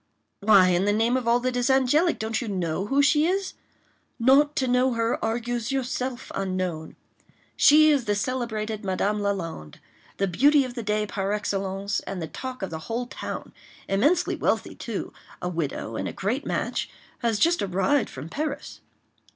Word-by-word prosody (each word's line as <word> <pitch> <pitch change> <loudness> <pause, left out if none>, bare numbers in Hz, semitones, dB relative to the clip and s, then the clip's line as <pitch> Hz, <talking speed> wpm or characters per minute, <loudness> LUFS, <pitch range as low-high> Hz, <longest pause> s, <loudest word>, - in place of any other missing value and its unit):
"Why, 200 -3 +6
in 180 +2 +2
the 205 - +2
name 225 +3 +2
of 255 -2 -1
all 235 +1 +4
that 255 0 -1
is 245 +1 +1
angelic, 270 +6 +3
don't 220 +2 -2
you 240 - -4
know 185 -1 -2
who 280 +3 +3
she 300 +2 +4
is? 380 +1 -1 0.6
'Not 275 +5 +4
to 265 -4 0
know 250 +1 +2
her 230 0 -1
argues 235 +1 -2
yourself 255 -1 -3
unknown.' 185 -4 -3 0.6
She 310 +1 +6
is 275 -5 +1
the 205 - +1
celebrated 220 -2 -3
Madame 200 +2 0
Lalande—the 190 - -5
beauty 280 - +4
of 250 - -7
the 240 - -4
day 210 0 0
par 200 -1 -2
excellence, 200 0 -2
and 195 - -6
the 165 - -3
talk 255 - -7
of 190 - -4
the 160 - -4
whole 235 +2 -1
town. 245 - -7 0.3
Immensely 295 - +2
wealthy - - -1
too—a 180 - -6
widow, 150 -9 -3
and - - -2
a - - -5
great 235 +9 -2
match—has 230 -3 -3
just 335 +10 +3
arrived 195 +9 +1
from 135 +4 -8
Paris." 290 - -5
225 Hz, 165 wpm, -25 LUFS, 195-260 Hz, 0.6 s, Why